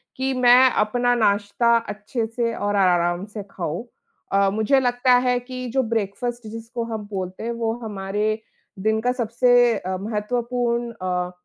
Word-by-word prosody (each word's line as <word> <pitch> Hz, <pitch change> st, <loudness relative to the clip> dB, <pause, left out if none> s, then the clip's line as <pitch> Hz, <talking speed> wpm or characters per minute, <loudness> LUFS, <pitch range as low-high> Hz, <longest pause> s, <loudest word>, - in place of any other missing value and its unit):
कि 265 Hz, +1 st, -1 dB
मैं 255 Hz, 0 st, +6 dB
अपना 245 Hz, +3 st, +1 dB
नाश्ता 210 Hz, +1 st, +2 dB
अच्छे 215 Hz, +3 st, -3 dB
से 230 Hz, 0 st, -2 dB
और 205 Hz, 0 st, -1 dB
आराम 175 Hz, -1 st, +2 dB
से 210 Hz, 0 st, -8 dB
खाऊँ। 175 Hz, +5 st, -4 dB, 0.5 s
अ, 195 Hz, 0 st, +4 dB
मुझे 220 Hz, +6 st, +3 dB
लगता 250 Hz, 0 st, +2 dB
है 250 Hz, 0 st, +2 dB
कि 255 Hz, +1 st, -7 dB
जो 265 Hz, -, +2 dB
ब्रेकफ़ास्ट 230 Hz, +1 st, -3 dB
जिसको 230 Hz, +2 st, -6 dB
हम 220 Hz, -3 st, -5 dB
बोलते 185 Hz, 0 st, -5 dB
हैं, 235 Hz, -, -2 dB
वो 230 Hz, -1 st, -1 dB
हमारे 210 Hz, +1 st, -2 dB, 0.4 s
दिन 220 Hz, +2 st, +1 dB
का 250 Hz, +2 st, +1 dB
सबसे 245 Hz, 0 st, +3 dB
अ, 185 Hz, -1 st, -4 dB
महत्वपूर्ण 235 Hz, +3 st, -2 dB
अ, 180 Hz, -1 st, -1 dB
225 Hz, 150 wpm, -23 LUFS, 205-245 Hz, 0.5 s, मैं